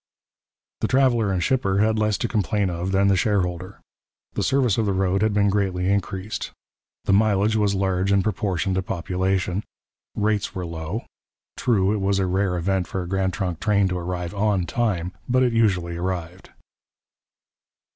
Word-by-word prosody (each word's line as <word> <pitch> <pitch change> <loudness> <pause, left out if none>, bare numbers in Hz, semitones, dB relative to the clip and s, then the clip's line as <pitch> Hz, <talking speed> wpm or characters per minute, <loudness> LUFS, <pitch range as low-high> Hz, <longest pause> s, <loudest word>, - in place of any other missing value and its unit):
The - - 0
traveller 120 -6 +3
and 90 -2 0
shipper 110 -6 +1
had 110 +1 +2
less 105 -2 +1
to 120 - -1
complain 105 -3 0
of 85 +2 -3
than 95 +1 +3
the 100 - +4
shareholder. 95 -2 -1 0.5
The - - -2
service 125 -6 +2
of 110 - +1
the 100 - +1
road 95 0 +1
had 110 0 +2
been 100 0 +2
greatly 95 -2 0
increased. 100 +1 -2 0.6
The - - +2
mileage 105 +1 +3
was 105 -2 +2
large 95 0 0
in 100 -1 +3
proportion 95 -2 -1
to 95 - +1
population. 95 +2 -1 0.5
Rates 105 0 0
were 90 -1 -3
low. 85 +6 -5 0.5
True, 100 -4 +2
it 105 - -1
was 100 0 +1
a 95 - +1
rare 95 0 0
event 95 +1 0
for 95 - -3
a - - -7
Grand 95 0 0
Trunk 90 -4 -3
train 100 -2 +2
to 90 -1 -2
arrive 90 +1 -4
on 100 -3 +1
time, 95 -6 -1 0.2
but 130 +1 +3
it 125 -2 +2
usually 90 -7 +1
arrived. 90 0 -4
95 Hz, 170 wpm, -23 LUFS, 90-105 Hz, 0.6 s, the